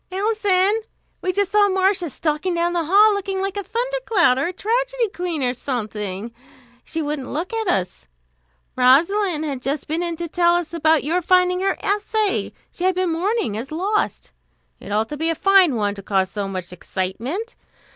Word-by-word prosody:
"Alison! 405 0 +2 0.4
We 370 - 0
just 400 +1 0
saw 415 -1 +4
Marcia 380 -2 +1
stalking 310 +5 -1
down 340 +1 0
the 340 -2 0
hall, 415 +6 +6
looking 390 -1 -2
like 390 0 -2
a 405 - -3
thundercloud, 460 - +1
or 280 - 0
a - - -2
tragedy 485 +4 -1
queen, 350 -6 -3
or 250 0 +1
something! 215 -4 -4 0.5
She 320 0 -3
wouldn't 290 -3 -4
look 345 +8 -3
at 445 -2 -2
us. 180 - -1 0.7
Rosalind 315 +7 +3
had 275 -4 -4
just 275 +3 -3
been 320 +3 -1
in 340 -1 -2
to 340 +1 -5
tell 345 +1 +3
us 345 -1 -2
about 320 -2 +3
your 335 +5 0
finding 360 +1 +3
her 390 +1 0
essay, 415 0 0 0.2
she 360 - -4
had 375 -1 +2
been 365 -2 0
mourning 375 - -1
as 235 +6 -6
lost. 395 +7 -1 0.5
It - - -10
ought 215 +2 0
to 300 - -5
be 320 +2 0
a 330 - 0
fine 380 -6 +4
one, 205 -2 0
to 200 - -9
cause 190 -1 0
so 200 -1 -3
much 185 -2 -6
excitement. 230 - -4
345 Hz, 185 wpm, -21 LUFS, 270-395 Hz, 0.7 s, hall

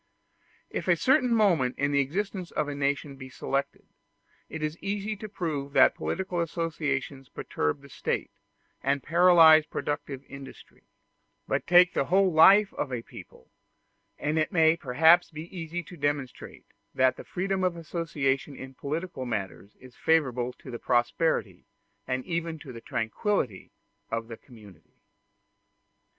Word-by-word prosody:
If - - -4
a - - +5
certain 255 -2 +2
moment 175 - +2
in 140 +1 0
the 140 - +2
existence 185 +6 -2
of 150 - -2
a 145 - -4
nation 140 0 -2
be 130 -1 -10
selected, 135 +1 -3 0.6
it 160 -1 -6
is 155 +1 -2
easy 205 +2 -3
to 215 +1 -8
prove 150 -8 -4
that 135 -2 +6
political 185 -2 -3
associations 150 -5 -3
perturb 75 - -3
the 140 - -14
State, - - -3 0.5
and 140 0 0
paralyze 165 -2 +6
productive 145 -2 -4
industry; 140 -1 -13 0.6
but - - -1
take 180 +1 +6
the - - 0
whole 190 +4 +3
life 195 +6 +6
of 135 - -4
a 120 -2 -4
people, 65 - -14 0.7
and 155 +2 -1
it 155 - 0
may 160 -3 +4
perhaps 160 +5 +4
be 160 +4 -10
easy 170 0 -5
to 175 - -12
demonstrate 145 -3 -4 0.3
that 130 0 +2
freedom 190 +1 -2
of 180 -2 +1
association 150 -4 -2
in 130 0 -9
political 145 0 -5
matters 100 -2 -5
is 130 -1 -15
favorable 125 -6 +1
to 130 - -12
the 120 - -6
prosperity 125 +7 0 0.4
and 130 0 -2
even 165 -1 -3
to 145 -4 -11
the 115 - -9
tranquillity 115 - -2 0.4
of 115 0 -4
the 115 - -7
community. 105 - -17
150 Hz, 145 wpm, -27 LUFS, 130-175 Hz, 0.7 s, that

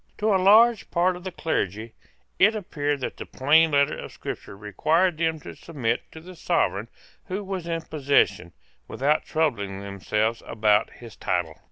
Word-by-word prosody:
To 215 0 +1
a 190 - +2
large 220 +4 +5
part 180 +1 +1
of 180 - -10
the 185 - -5
clergy 110 - -3 0.5
it 215 +4 +5
appeared 145 -8 -2
that - - -4
the - - -7
plain 155 +5 +4
letter 140 -1 +2
of - - -8
Scripture 100 - -8
required 155 - +1
them 160 -1 0
to - - -10
submit 125 -8 -3
to 160 - -10
the 180 +3 -12
Sovereign 115 - 0 0.4
who 195 +3 -4
was 190 -3 -5
in 165 -1 -2
possession, 135 - +1 0.4
without 145 +3 0
troubling 105 -12 -1
themselves 105 +3 -2
about 105 -2 +2
his 115 -3 -12
title. 85 -3 -2
150 Hz, 165 wpm, -25 LUFS, 110-175 Hz, 0.5 s, large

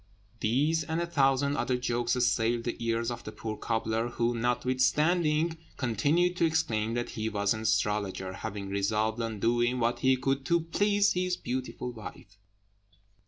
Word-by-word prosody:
These 145 +9 +1
and 160 +3 -2
a 170 - 0
thousand 140 -3 +2
other 125 - 0
jokes 120 -1 0
assailed 120 -1 +1
the 120 - -2
ears 115 +1 0
of 120 0 -6
the 110 - -7
poor 110 0 -5
cobbler, 110 +1 -1
who, 120 0 0
notwithstanding, 150 +7 +1 0.2
continued 145 - +1
to 170 - +3
exclaim 115 -9 0
that 120 0 -2
he 110 0 -2
was 100 -1 +1
an 110 - -5
astrologer, 105 -3 0
having 100 +1 -5
resolved 110 +3 0
on 115 -2 -3
doing 120 +3 +2
what 120 +1 +1
he 130 0 +3
could 135 +1 -1
to 170 +4 +2
please 205 +5 +2
his 180 0 0
beautiful 125 0 -4
wife. 105 -3 -11
120 Hz, 160 wpm, -29 LUFS, 110-150 Hz, 0.2 s, to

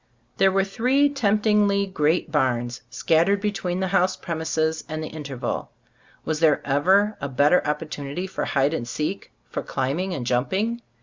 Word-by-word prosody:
There 195 0 +4
were 195 0 +2
three 255 +9 +2
temptingly 210 -5 +2
great 165 -3 0
barns, 125 -4 0
scattered 170 +5 +2
between 195 -3 -2
the 190 - 0
house 185 0 +2
premises 160 -1 -2
and 155 0 -4
the 155 - -5
interval. 140 -5 -5 0.6
Was 155 -1 -1
there 160 -3 +4
ever 190 +10 +3
a 140 - -3
better 145 +7 +3
opportunity 150 +2 -3
for 190 - -3
hide 140 +3 +1
and 120 -7 -3
seek, 155 +10 -4 0.2
for - - -4
climbing 160 +8 -2
and 125 - -4
jumping? 190 - 0
165 Hz, 150 wpm, -24 LUFS, 145-195 Hz, 0.6 s, There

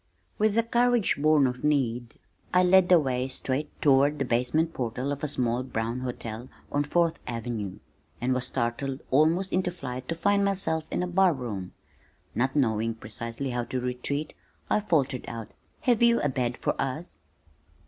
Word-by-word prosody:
With 215 0 +2
a 230 - +4
courage 240 -1 +2
born 155 -2 +5
of 125 -1 -2
need 125 -6 0 0.4
I 180 - +6
led 180 0 +5
the 180 -2 +7
way 130 -3 -1
straight 135 +2 -3
toward 145 +1 +4
the 140 - -1
basement 125 +8 +1
portal 125 +3 -2
of 145 +1 -4
a - - +1
small 125 -4 +1
brown 115 -1 -3
hotel 120 -1 -5 0.2
on 145 0 +1
Fourth 170 +2 +1
Avenue, 115 -5 -4 0.4
and 130 +2 +1
was 125 0 -1
startled 130 +4 -2
almost 165 +7 +3
into 185 0 +1
flight 130 -7 -6
to 165 - -1
find 200 +4 +2
myself 185 -5 0
in 180 - -1
a - - -1
bar 180 0 +4
room. 105 -8 -5 0.6
Not 130 +5 0
knowing 115 -4 +1
precisely 115 +4 -5
how 120 -1 -2
to 130 - -3
retreat, 125 +4 -3 0.4
I - - +4
faltered 145 - 0
out, 115 -1 -7 0.3
"Have 240 -3 +2
you 235 0 +5
a 145 - +1
bed 125 -2 -1
for - - 0
us?" 135 +6 -4
135 Hz, 170 wpm, -27 LUFS, 120-165 Hz, 0.6 s, the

